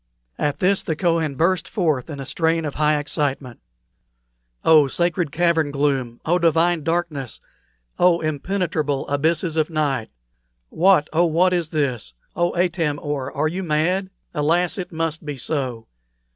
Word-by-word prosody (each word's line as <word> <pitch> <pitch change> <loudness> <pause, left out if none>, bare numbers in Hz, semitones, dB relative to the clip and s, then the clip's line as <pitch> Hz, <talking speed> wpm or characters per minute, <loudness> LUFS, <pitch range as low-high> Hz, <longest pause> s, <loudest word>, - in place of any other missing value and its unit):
At 145 -1 0
this 190 +1 +2
the 160 - -2
Kohen 165 -3 0
burst 175 +6 +1
forth 160 - 0
in 145 -3 -6
a 135 - -5
strain 165 +1 0
of 145 - -3
high 150 0 +2
excitement: 140 -4 -2 1.1
"Oh, 155 -3 +6
sacred 170 +1 0
cavern 165 -2 +2
gloom! 135 -4 -1
Oh, 175 +3 +2
divine 170 0 +2
darkness! 165 -6 -2 0.6
Oh, 175 -1 +4
impenetrable 155 -2 -2
abysses 160 +3 0
of 155 +1 +1
night! 145 -8 -1 0.6
What, 175 -3 +4
oh, 170 +2 +4
what 180 +3 +3
is 170 -3 0
this! 130 - -2 0.2
Oh, 175 0 0
Atam 170 -4 0
or, 140 -2 -3
are 150 +2 0
you 180 +4 -3
mad? 180 +3 0 0.2
Alas! 170 +6 +1
it 180 0 -5
must 165 0 -3
be 145 -2 -5
so. 125 -4 -2
160 Hz, 145 wpm, -22 LUFS, 145-175 Hz, 1.1 s, Oh